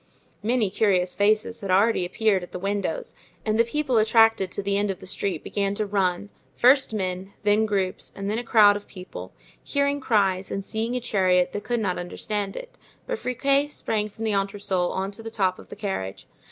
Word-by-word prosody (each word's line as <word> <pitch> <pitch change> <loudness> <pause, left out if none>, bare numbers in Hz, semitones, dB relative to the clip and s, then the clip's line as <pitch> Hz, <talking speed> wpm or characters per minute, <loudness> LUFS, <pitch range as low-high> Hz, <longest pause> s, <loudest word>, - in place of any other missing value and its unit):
Many 225 -2 +1
curious 190 -4 +2
faces 215 +2 +1
had 195 - -5
already 190 -1 +3
appeared 205 0 +1
at 180 - -10
the - - -3
windows 205 - -3 0.3
and 215 0 +1
the - - +7
people 260 0 0
attracted 220 -3 +4
to 200 - -3
the 200 0 0
end 205 0 +1
of 190 - -3
the - - -11
street 195 0 -3
began 200 0 -1
to 215 - -1
run, 195 -1 0 0.3
first 265 +1 +5
men, 190 -2 -3
then 210 +1 +3
groups, 195 -3 -2
and 195 0 -5
then 215 +3 0
a - - -5
crowd 210 -3 +6
of 205 - -7
people; 185 -1 -9 0.3
hearing 280 0 0
cries 195 -6 +1
and 195 0 -4
seeing 225 +2 -2
a - - +1
chariot 185 -6 +2
they - - -2
could 240 +2 -1
not 185 -4 -1
understand 195 +3 -4
it; - - -9 0.3
but 485 -2 -3
Friquet 275 +3 +1
sprang 215 -7 -2
from 220 +2 -9
the 220 -2 0
entresol 195 -2 0
on 190 +1 -2
to 205 - -9
the 225 - -6
top 190 -4 0
of - - -14
the - - -8
carriage. 145 - -4
205 Hz, 205 wpm, -25 LUFS, 190-225 Hz, 0.3 s, the